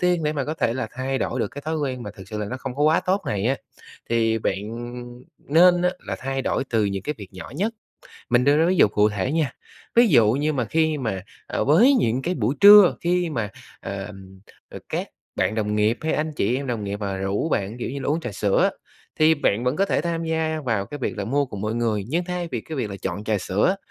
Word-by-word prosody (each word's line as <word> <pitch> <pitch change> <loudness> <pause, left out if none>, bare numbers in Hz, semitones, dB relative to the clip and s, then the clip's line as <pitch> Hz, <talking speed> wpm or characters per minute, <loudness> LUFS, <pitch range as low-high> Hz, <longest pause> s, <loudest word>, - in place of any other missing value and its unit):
tiên 180 -2 +2
để 150 0 0
mà 140 -3 -2
có 155 - -3
thể 120 -7 0
là 130 -4 -3
thay 130 +1 -2
đổi 130 - -2
được 105 - 0
cái 145 +5 -9
thói 160 +1 -2
quen 130 -4 -3
mà 105 - -6
thực 95 -1 -13
sự 105 - -5
là 105 - -3
nó 130 +5 -4
không 130 -1 -6
có 145 - -1
quá 155 +2 +4
tốt 195 +2 +1
này 100 0 -1
á, 135 +2 +1 0.5
thì 115 -1 +2
bạn 100 -2 -1 0.8
nên 175 +4 +4
á 180 - +3 0.2
là - - -3
thay 135 0 -3
đổi - - -1
từ 110 -2 +2
những 100 -1 -2
cái 150 - -3
việc 100 - -9
nhỏ 95 - -9
nhất. 220 +6 -1 0.6
Mình 120 +1 +4
đưa 145 +2 +4
ra 160 - +4
ví 185 +2 +2
dụ 110 - +6
cụ 105 +1 +3
thể 105 +5 -2
nha, 155 -6 0 0.4
ví 235 0 +7
dụ 115 - +5
như 145 +4 0
mà 130 -5 -1
khi 160 +4 +1
mà, 110 -8 -3 0.2
à, - - -2
với 220 - +5
những 120 - 0
cái 180 +5 -1
buổi 140 - 0
trưa, 205 -2 +9
khi 175 -1 +1
mà, 115 -7 -2 0.3
ờm, 95 -1 -8 0.3
ờ, - - -9
các - - -3 0.3
bạn 95 +2 +1
đồng 105 -1 -1
nghiệp 105 +3 +2
hay 160 - -1
anh 155 +1 -1
chị 120 +2 +1
em 140 - -4
đồng 115 -4 -3
nghiệp 100 0 -3
mà 100 -2 -2
rủ 95 +9 -1
bạn, 110 -4 -2
kiểu 120 - -3
như 140 +1 -5
là, - - -4
uống 155 +3 +1
trà 120 -9 -5
sữa 100 0 +1
á, - - +3 0.5
thì 155 +1 +6
bạn 120 -6 0
vẫn 125 +3 0
có 195 - +3
thể 200 - 0
tham 165 +1 -2
gia 160 -1 -1
vào 110 -6 0
cái 145 - -7
việc 120 -4 -3
là 100 - -2
mua 140 +5 0
cùng 105 -6 -7
mọi 110 +2 -2
người. 110 -4 0
Nhưng 170 +6 0
thay 180 -1 -3
vì 120 - -1
cái 155 +7 -7
việc 120 -6 -2
là 100 - -5
chọn 105 - -4
trà 110 -1 0
sữa, 105 - +1
130 Hz, 260 wpm, -23 LUFS, 105-160 Hz, 0.8 s, trưa